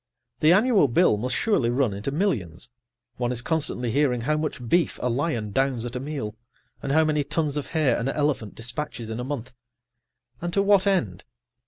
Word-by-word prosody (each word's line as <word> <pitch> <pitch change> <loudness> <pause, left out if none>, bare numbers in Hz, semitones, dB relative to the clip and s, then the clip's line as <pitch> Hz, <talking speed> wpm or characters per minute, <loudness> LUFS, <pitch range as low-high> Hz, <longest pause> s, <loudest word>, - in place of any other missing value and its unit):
The 155 - +5
annual 205 - +4
bill 135 +1 +4
must 125 +4 -2
surely 200 - +1
run 120 -3 +1
into 100 +7 -4
millions; 120 - -2 0.5
one 120 0 -1
is 120 -1 -1
constantly 140 -7 -1
hearing 130 -3 +1
how 150 +6 +1
much 150 -5 -3
beef 170 +5 +2
a 125 - 0
lion 120 -5 -1
downs 130 0 0
at 120 +1 -6
a - - -1
meal, 135 -6 -4 0.5
and 135 - -3
how 160 +2 +4
many 150 -1 +1
tons 150 0 -1
of 145 - -3
hay 155 -5 +2
an 120 +3 -1
elephant 140 -8 -1
dispatches 120 -1 -5
in 110 - -4
a - - -3
month. 130 -2 -5 0.9
And 175 0 -2
to 200 - +3
what 200 -1 +4
end? 120 - 0
135 Hz, 190 wpm, -25 LUFS, 120-155 Hz, 0.9 s, The